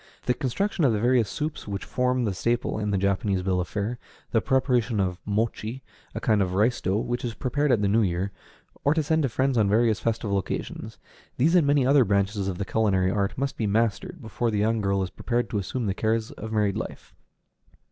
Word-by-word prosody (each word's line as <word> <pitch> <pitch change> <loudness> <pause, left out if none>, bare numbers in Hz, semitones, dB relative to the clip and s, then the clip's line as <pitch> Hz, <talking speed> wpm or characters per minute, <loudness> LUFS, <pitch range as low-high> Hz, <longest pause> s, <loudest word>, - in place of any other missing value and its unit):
The 125 - +3
construction 170 - -1
of 130 -5 +4
the 105 - 0
various 120 -2 +3
soups 150 -4 -4
which 100 -1 -4
form 125 -1 0
the 100 - -1
staple 115 +3 -1
in 105 -1 -1
the 100 - +1
Japanese 100 0 0
bill 90 -1 +1
of 90 - -4
fare; 110 +4 -3 0.3
the 115 - +3
preparation 125 -4 +1
of 90 -2 -1
mochi, 110 +4 -2 0.3
a - - -2
kind 110 -3 +2
of 90 -1 -1
rice 110 +5 +2
dough, 95 +2 0
which 120 +2 -2
is 120 -2 -3
prepared 145 +2 0
at 110 -4 +2
the - - +3
New 110 +3 +3
Year, 95 0 -1 0.5
or 145 +2 +3
to 160 - +2
send 160 +2 +1
to 135 - +1
friends 130 +1 +1
on 105 -2 +3
various 110 +1 +3
festival 110 -3 0
occasions: 95 - -5 0.4
these 155 +7 +3
and 170 -5 +4
many 140 -2 +3
other 135 0 +5
branches 100 -1 0
of 95 -2 -3
the 100 - -3
culinary 95 -4 +1
art 100 -1 -1
must 140 +1 -2
be 110 - 0
mastered 115 - 0
before 115 +2 -1
the 105 - -1
young 110 +2 +1
girl 100 -1 +1
is 90 - -5
prepared 120 0 -2
to 105 - 0
assume 115 +5 -3
the 100 - 0
cares 110 +2 -1
of 110 - -8
married 105 -3 +1
life. - - -7
110 Hz, 220 wpm, -26 LUFS, 100-125 Hz, 0.5 s, other